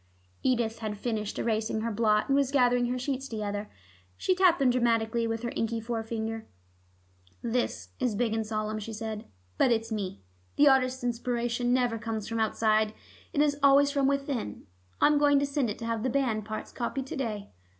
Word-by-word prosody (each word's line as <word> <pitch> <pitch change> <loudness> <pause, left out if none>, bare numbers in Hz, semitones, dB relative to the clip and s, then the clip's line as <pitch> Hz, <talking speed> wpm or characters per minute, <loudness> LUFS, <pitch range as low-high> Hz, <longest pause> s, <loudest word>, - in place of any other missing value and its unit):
Edith 230 -3 +1
had 215 -2 -4
finished 215 -2 -3
erasing 220 -1 0
her 230 +1 -1
blot, 215 -1 +2
and 275 - +3
was 280 -2 +3
gathering 245 -3 +3
her 250 +1 -1
sheets 270 +1 -3
together. 210 -2 -4 0.5
She 370 - +2
tapped 365 -2 +4
them 265 -2 +3
dramatically 230 -1 +1
with 225 +1 -3
an 240 - -2
inky 225 0 -1
forefinger. 225 -1 -4 1.0
"This 240 +1 -1
is 250 -5 0
big 225 0 0
and 225 0 0
solemn," 215 0 -2
she 220 +2 -6
said. 220 0 -5 0.3
"But 255 - +5
it's 225 0 0
Me. 190 - -4 0.3
The 290 - +6
artist's 260 -2 +3
inspiration 240 0 -1
never 245 -3 +2
comes 220 -2 -4
from 230 0 -2
outside: 220 -1 +2 0.4
it 290 - +1
is 290 -1 +1
always 280 +1 +6
from 280 -2 +2
within. 275 - -2 0.3
I'm 295 -1 +5
going 290 -1 +5
to 280 - +2
send 280 -4 0
it 210 - -4
to 230 - -6
have 230 -1 -1
the 260 - 0
band 235 -5 0
parts 215 0 -5
copied 260 +2 -3
to 270 - -6
day." 215 -7 -4
230 Hz, 185 wpm, -29 LUFS, 220-260 Hz, 1.0 s, The